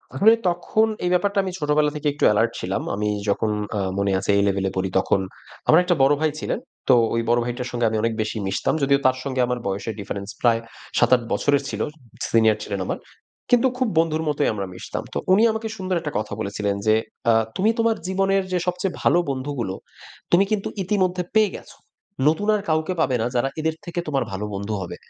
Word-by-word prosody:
আসলে 220 +3 +6 0.2
তখন 175 +5 +1 0.2
এই - - +2
ব্যাপারটা 200 +3 +2
আমি 190 - -3
ছোটবেলা 150 0 +2
থেকে 150 0 -2
একটু 145 - -5
এলার্ট 115 +2 +2
ছিলাম। 95 +2 -2
আমি 105 +1 -1 0.2
যখন 105 +2 +1 0.3
আ - - 0 0.2
মনে 100 0 +1
আছে 95 - -7
এই 100 - +3
লেভেলে 95 -1 0
পড়ি 95 0 -1
তখন। 95 - +1 0.5
আমার 160 - +7
একটা 180 -1 +2
বড় 135 +2 +5
ভাই 155 -1 +2
ছিলেন। - - -2 0.3
তো - - +8 0.2
ওই 115 - +1
বড় 120 +1 +4
ভাইটার 125 +1 -4
সঙ্গে 120 -1 0
আমি 110 - -1
অনেক 115 0 0
বেশি 110 +1 -3
মিশতাম। 95 - 0
যদিও 140 0 +4
তার 130 0 +4
সঙ্গে 130 -2 -1
আমার 125 0 -1
বয়সের 100 +3 -3
difference 100 +1 -5
প্রায় 115 -2 +4 0.4
৭, - - +4
৮ 125 - -2
বছরের 140 +7 +2
ছিল। - - -4 0.5
সিনিয়র 110 -2 +4
ছিলেন 100 -2 -4
আমার, - - -2 0.5
কিন্তু 245 +1 +5
খুব 255 -1 +1
বন্ধুর 160 -1 +1
মতোই 145 0 +1
আমরা 100 -2 -3
মিশতাম। 90 - -6
তো - - -2 0.2
উনি 210 +4 +5
আমাকে 220 0 -3
সুন্দর 185 -2 -1
একটা 150 -3 -4
কথা 105 -1 -5
বলেছিলেন 100 -1 -2
যে 110 - +6 0.4
আ - - +5 0.2
"তুমি 205 +4 +3
তোমার 230 0 +3
জীবনের 195 +1 +1
যে 180 - +2
সবচেয়ে 180 +1 -1
ভালো - - +4
বন্ধুগুলো 130 -7 -3 0.6
তুমি 175 +3 +6
কিন্তু 210 -2 0 0.2
ইতিমধ্যে 185 -1 0
পেয়ে 215 -3 +4
গেছ। - - -14 0.6
নতুন 160 +7 -1
আর 210 - -1
কাউকে 160 +3 +1
পাবে 130 -5 +2
না - - 0
যারা 125 +2 +2
এদের 160 0 0
থেকে 175 0 -4
তোমার 135 -3 0
ভালো 95 +2 -3
বন্ধু 100 +2 -3
হবে।" 85 - -6
140 Hz, 205 wpm, -23 LUFS, 110-180 Hz, 0.6 s, তো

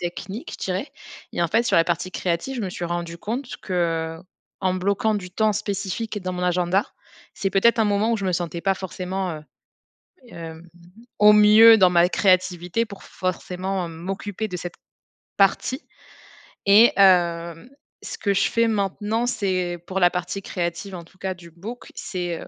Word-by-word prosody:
techniques, 190 +5 -6
je - - -6
dirais. 190 +10 -3 0.4
Et 175 - -1
en 170 - +1
fait, 230 +7 +2
sur 240 - +2
la 165 - +6
partie 175 +2 -2
créative, 180 +9 -2
je - - -3
me 190 - -3
suis 175 - -5
rendu 170 0 -4
compte 245 +7 -4
que, 165 -3 -1 0.4
en 185 -1 +1
bloquant 200 +3 0
du 180 -2 -6
temps 215 +2 +2
spécifique 210 +1 -3
dans 185 - -3
mon 180 0 -4
agenda, 180 +2 +1 0.5
c'est 195 - -2
peut-être 200 +5 +3
un - - +4
moment 210 +2 +1
où - - +2
je 200 - -5
me 185 - +1
sentais 170 -1 -3
pas 195 +1 +1
forcément 190 0 -4
heu, 150 - -10 0.9
hem, 165 -1 -9 0.5
au 210 0 +8
mieux 215 +2 +8
dans 185 -4 +5
ma 175 0 +4
créativité 185 +2 +1
pour 200 - -11
forcément 185 0 -3
m'occuper 195 +5 -5
de 180 - -5
cette 175 0 -6 0.6
partie. 200 +6 +2 0.8
Et 210 +4 +7
hem, 170 0 +3 0.3
ce - - -6
que 200 - 0
je 200 0 +2
fais 230 -1 +2
maintenant, 215 +2 -1
c'est 185 -7 -1
pour 190 0 -2
la 175 - +5
partie 180 +2 -3
créative 175 +2 -4
en 170 - -8
tout 175 +3 -23
cas 190 0 -2
du 170 -1 -14
book, 210 +9 -9
c'est 175 -3 -4
heu, - - -10
185 Hz, 175 wpm, -23 LUFS, 175-205 Hz, 0.9 s, au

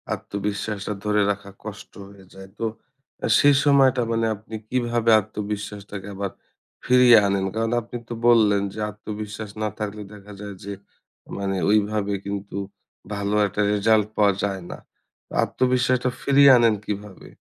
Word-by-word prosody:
আত্মবিশ্বাসটা 105 0 -4
ধরে 105 0 +2
রাখা 100 0 -6
কষ্ট 105 0 -8 0.2
হয়ে 100 -1 -16
যায়। 95 0 -12
তো 115 - -1 0.6
আ - - +1
সেই 145 0 +6
সময়টা 135 -3 +4
মানে 115 0 +1
আপনি 110 +2 -10
কিভাবে 120 -2 +1
আত্মবিশ্বাসটাকে 105 -1 -6
আবার 100 -1 -3 0.5
ফিরিয়ে 125 -2 +7
আনেন? 100 -1 0
কারণ 115 0 0
আপনি 120 +2 -7
তো - - -3
বললেন 105 -4 +5
যে - - -8
আত্মবিশ্বাস 105 0 -7
না 105 - 0
থাকলে 105 0 -4
দেখা 105 0 -13
যায় 100 -1 -7
যে 100 - -5 0.6
মানে 100 -1 -2
ওইভাবে 105 -1 +1
কিন্তু 100 -1 -5 0.6
ভালো 100 +1 -1
একটা 105 - -2
রেজাল্ট 105 0 +3
পাওয়া 100 -2 +4
যায় 100 -2 -2
না। - - -7 0.7
আত্মবিশ্বাসটা 125 0 +1
ফিরিয়ে 140 0 +6
আনেন 115 -2 +4
কিভাবে? 105 -2 -6
105 Hz, 140 wpm, -23 LUFS, 100-115 Hz, 0.7 s, ফিরিয়ে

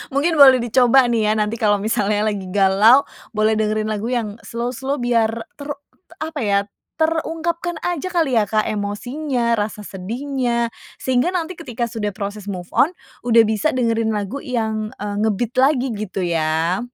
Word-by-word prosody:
Mungkin 310 +3 +1
boleh 260 -3 +8
dicoba 250 +2 +5
nih 225 -2 +1
ya, - - +3
nanti 215 +1 -1
kalau 210 -1 +3
misalnya 210 0 0
lagi 195 -2 -5
galau 200 +7 +5 0.3
boleh 215 +1 +3
dengerin 215 0 0
lagu 215 +1 -3
yang 230 -3 -2
slow-slow, 250 +4 -3
biar 240 -4 +2 0.3
ter 285 - -7 0.4
t - - -32
apa 315 -1 -5
ya, 200 -5 +2 0.4
terungkapkan 330 +2 -1
aja 355 0 -2
kali 325 -10 +2
ya, 210 - 0
Kak, 215 +1 +1
emosinya, 235 +4 -2
rasa 210 0 -3
sedihnya. 235 +4 -2 0.3
Sehingga 260 +8 +1
nanti 350 0 -3
ketika 250 -7 -4
sudah 220 -4 -3
proses 205 0 -6
move 180 -3 -6
on, 340 +6 +2 0.3
udah 230 -1 +6
bisa 220 +7 0
dengerin 230 -3 +1
lagu 210 +6 -3
yang, 220 -4 -3
eee, 205 0 -5
nge-beat 220 +2 0
lagi 270 -1 +3
gitu 205 -3 -4
ya. 165 +1 0
230 Hz, 160 wpm, -20 LUFS, 210-265 Hz, 0.4 s, boleh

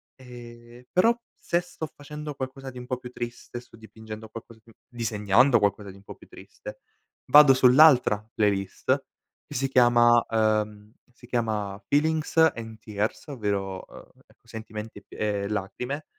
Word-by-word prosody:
Ehm, 120 -1 -13
però 225 +6 +4 0.2
se 170 - 0
sto 175 -3 -7
facendo 150 +1 -8
qualcosa 135 0 -6
di 125 - -13
un 125 - -9
po' 130 - -2
più 125 -1 -11
triste, 120 0 -7
sto 120 - -17
dipingendo 110 0 -11
qualcosa 115 0 -11
di 115 0 -20
disegnando 115 +1 +2
qualcosa 100 0 -1
di 95 - -15
un 100 - -19
po' - - -11
più - - -18
triste, - - -12 0.5
vado 145 -2 +8
sull'altra 125 -5 +5
playlist 100 -3 0 0.4
che - - -9
si 135 +2 -1
chiama 120 -2 +5
ehm, 110 -1 0 0.2
si 120 - -17
chiama 110 -4 -2
"Feelings 155 +2 0
and 115 -9 +2
Tears" 105 +4 -4
ovvero, 100 -8 -3
ehm, - - -15 0.2
ecco, - - -29
sentimenti 110 -1 -8
p - - -20
e 100 -2 -2
lacrime 125 +8 -4
120 Hz, 150 wpm, -26 LUFS, 105-130 Hz, 0.5 s, vado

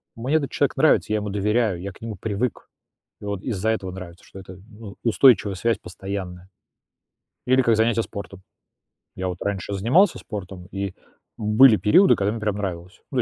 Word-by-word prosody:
мне 125 +7 -1
этот 140 -3 -3
человек 140 -1 0
нравится, 150 -6 +3
я 110 - +2
ему 105 0 -4
доверяю, 105 -2 0
я 100 - -5
к - - -18
нему 115 -2 -6
привык, 110 +3 -3 0.5
и - - -9
вот 100 -2 -4
из-за 110 -3 -3
этого 95 -4 -3
нравится, 90 -2 -10
что 95 - -12
это, 95 -1 -11
ну, 105 -2 -11
устойчивая 115 -4 +4
связь 115 +4 0
постоянная. 95 -1 -7 1.0
Или 130 +1 +4
как 115 -2 +3
занятия 115 0 +2
спортом. 100 -3 -9 0.8
Я 95 0 -3
вот 90 -1 -4
раньше 100 0 -3
занимался 130 - +3
спортом, 95 -3 -8
и 95 -1 -4 0.4
были 110 +3 +6
периоды, 175 - +5
когда 100 +1 0
мне 115 - -5
прям 105 -2 -1
нравилось. 90 -2 -6
Ну, 130 -2 +1
105 Hz, 175 wpm, -23 LUFS, 95-115 Hz, 1.0 s, были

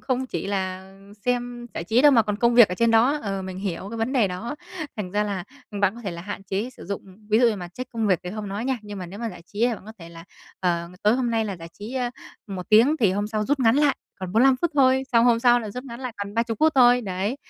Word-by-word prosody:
không 260 0 -1
chỉ 245 - -4
là 190 -1 -3 0.3
xem 245 -1 -2
giải 165 - -4
trí 230 +6 +3
đâu 295 -1 +7
mà 230 -3 +6
còn 210 -1 -2
công 235 +2 +2
việc 235 -3 +8
ở 180 - -3
trên 230 +2 +2
đó, 240 +6 +4
ờ, 195 -2 -3
mình 185 0 -6
hiểu 190 -1 -4
cái 230 - -5
vấn 225 +4 -1
đề 235 -7 +3
đó. 220 +10 -5 0.4
Thành 190 -4 -4
ra 210 0 +1
là, 195 -3 -3 0.3
ừm, 205 - -5
bạn 200 +1 +2
có 235 - -10
thể 195 - -3
là 170 0 -7
hạn 205 0 -6
chế 200 +6 -3
sử - - -13
dụng 200 0 -4 0.3
ví 215 - +5
dụ 240 -1 +5
như 215 - -1
mà 175 -2 -7
check 255 +8 -8
công 225 -2 -1
việc 185 -4 +3
thì 180 - -5
hông 210 0 -5
nói 205 +4 -4
nha, 260 -1 0
nhưng 205 -1 -8
mà 180 - -6
nếu 190 +4 -9
mà 230 0 -3
giải 170 - -12
trí 210 - -8
thì 240 - 0
bạn 195 - -12
có 220 - -8
thể 165 -1 -10
là, 165 0 -12 0.4
ờ, 170 -2 0
tối 210 +3 +4
hôm 250 -2 0
nay 225 -1 +1
là 200 -3 -4
giải 165 -1 -10
trí, 215 +5 -8
ơ, 245 -2 -1 0.4
1 190 -3 -6
tiếng 240 +9 +5
thì 200 -5 +4
hôm 205 +1 -1
sau 215 0 -2
rút 285 +2 0
ngắn 230 +1 +4
lại 290 -1 +3 0.2
còn 185 -1 -5
45 255 +4 +5
phút 345 - +2
thôi, 265 -1 +4
xong 230 0 +5
hôm 235 -2 +4
sau 245 0 +5
là 215 -2 -6
rút 250 +5 -7
ngắn 235 -1 -8
lại 255 -3 -4
còn 200 +1 -6
30 230 -1 -1
phút 315 0 +5
thôi, 245 -1 +6
đấy. 200 +3 -2
220 Hz, 300 wpm, -24 LUFS, 195-245 Hz, 0.4 s, việc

